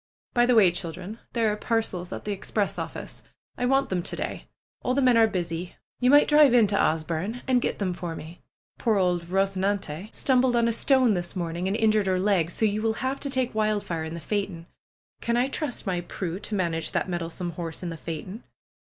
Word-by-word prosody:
By 240 Hz, -1 st, +4 dB
the 250 Hz, -, +4 dB
way, 195 Hz, -6 st, +6 dB
children, 175 Hz, +5 st, -5 dB
there 225 Hz, -3 st, +2 dB
are -, -, -2 dB
parcels 210 Hz, -5 st, -1 dB
at -, -, -6 dB
the 210 Hz, -, -2 dB
express 200 Hz, +1 st, -2 dB
office. -, -, -6 dB, 0.3 s
I 245 Hz, -, -1 dB
want 270 Hz, +1 st, +2 dB
them 185 Hz, -2 st, 0 dB
to -, -, -3 dB
day. -, -, -5 dB, 0.3 s
All 250 Hz, -, 0 dB
the 280 Hz, -, +2 dB
men 250 Hz, -2 st, +5 dB
are 225 Hz, -1 st, +6 dB
busy. 175 Hz, -3 st, -4 dB, 0.2 s
You 250 Hz, -, +3 dB
might 290 Hz, +2 st, +7 dB
drive 295 Hz, -4 st, +6 dB
into 210 Hz, -4 st, +4 dB
Asburne 165 Hz, +7 st, 0 dB
and 255 Hz, -2 st, +3 dB
get -, -, -1 dB
them 190 Hz, -3 st, -1 dB
for 175 Hz, -2 st, -5 dB
me. 160 Hz, +3 st, -10 dB, 0.4 s
Poor 220 Hz, -3 st, +2 dB
old 180 Hz, -2 st, +2 dB
Eosenante 195 Hz, -2 st, -1 dB
stumbled 255 Hz, -2 st, +2 dB
on 235 Hz, -1 st, +3 dB
a 230 Hz, -, +2 dB
stone 255 Hz, -1 st, +4 dB
this 175 Hz, -1 st, -2 dB
morning 175 Hz, 0 st, -2 dB
and 195 Hz, +3 st, 0 dB
injured 215 Hz, -3 st, +3 dB
her 185 Hz, -1 st, +2 dB
leg. 185 Hz, -4 st, +2 dB
So 220 Hz, -, 0 dB
you 210 Hz, 0 st, 0 dB
will 220 Hz, 0 st, +1 dB
have 270 Hz, +1 st, -1 dB
to 280 Hz, -, -2 dB
take 260 Hz, -2 st, 0 dB
Wildfire 210 Hz, -6 st, -1 dB
in 160 Hz, +1 st, -5 dB
the -, -, -5 dB
phaeton. 195 Hz, -1 st, -3 dB, 0.6 s
I -, -, -9 dB
can 240 Hz, +3 st, +1 dB
trust 290 Hz, -5 st, -3 dB
my 180 Hz, -3 st, -1 dB
Prue 175 Hz, 0 st, -5 dB
to 210 Hz, -, -4 dB
manage 170 Hz, -4 st, -1 dB
that -, -, 0 dB
mettlesome 175 Hz, 0 st, -3 dB
horse 165 Hz, +1 st, -6 dB
in 175 Hz, -, -3 dB
the 165 Hz, -, -5 dB
phaeton?" 170 Hz, +8 st, -6 dB
200 Hz, 215 wpm, -26 LUFS, 175-235 Hz, 0.6 s, might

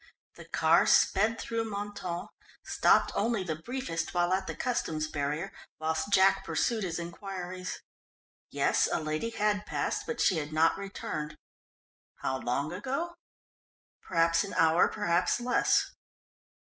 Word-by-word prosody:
The -, -, -11 dB
car -, -, +3 dB
sped 220 Hz, +3 st, +4 dB
through 225 Hz, -1 st, -2 dB
Mentone, 200 Hz, -4 st, -5 dB, 0.4 s
stopped -, -, +3 dB
only 220 Hz, -1 st, 0 dB
the 160 Hz, -4 st, -2 dB
briefest 180 Hz, -2 st, -4 dB
while 175 Hz, +1 st, +2 dB
at 190 Hz, 0 st, -1 dB
the -, -, -4 dB
Customs 160 Hz, -11 st, -1 dB
barrier 150 Hz, +5 st, -2 dB, 0.3 s
whilst 160 Hz, +3 st, -1 dB
Jack 195 Hz, 0 st, +5 dB
pursued 215 Hz, +7 st, 0 dB
his 170 Hz, -3 st, -2 dB
inquiries. 180 Hz, +1 st, -6 dB, 0.7 s
Yes, -, -, +2 dB
a -, -, +1 dB
lady 155 Hz, +7 st, -2 dB
had 210 Hz, -2 st, 0 dB
passed, -, -, -2 dB
but 470 Hz, -, -3 dB
she 185 Hz, -, +3 dB
had 150 Hz, -1 st, -3 dB
not 160 Hz, +1 st, +3 dB
returned. 155 Hz, -6 st, -5 dB, 0.8 s
How 130 Hz, 0 st, -2 dB
long 140 Hz, +7 st, -2 dB
ago? 275 Hz, -, -3 dB, 0.9 s
Perhaps 165 Hz, +1 st, +2 dB
an 200 Hz, -, -7 dB
hour; 165 Hz, 0 st, +5 dB
perhaps 180 Hz, -1 st, +1 dB
less. 245 Hz, +1 st, +2 dB
185 Hz, 135 wpm, -30 LUFS, 160-210 Hz, 0.9 s, Jack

